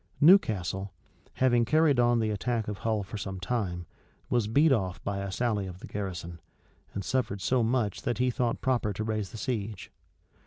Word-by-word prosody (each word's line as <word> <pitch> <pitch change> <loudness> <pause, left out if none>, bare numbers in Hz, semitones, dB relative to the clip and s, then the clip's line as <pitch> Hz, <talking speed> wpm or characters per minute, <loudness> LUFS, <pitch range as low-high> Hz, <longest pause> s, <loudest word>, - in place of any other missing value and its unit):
[*] - - -34
Newcastle, 100 - +4 0.4
having 120 -2 +3
carried 150 +1 +3
on 120 0 +4
the 110 -1 +1
attack 115 +2 -1
of 105 -3 -4
Hull 110 +1 0
for 105 +2 -7
some 95 -1 -5
time, 90 -4 -2 0.5
was 120 -4 +2
beat 145 +8 +4
off 95 -8 0
by 100 -1 -2
a 100 -1 -4
sally 105 -3 0
of 90 -1 -8
the - - -10
garrison, 85 -4 -5 0.6
and 100 - -3
suffered 115 -6 -1
so 125 +6 +1
much 115 -3 0
that 120 - -1
he 125 0 +2
thought 120 -1 -1
proper 120 -5 +1
to 105 - -3
raise 110 -3 -2
the 110 - -9
siege. 110 -5 -4
110 Hz, 190 wpm, -29 LUFS, 100-120 Hz, 0.6 s, Newcastle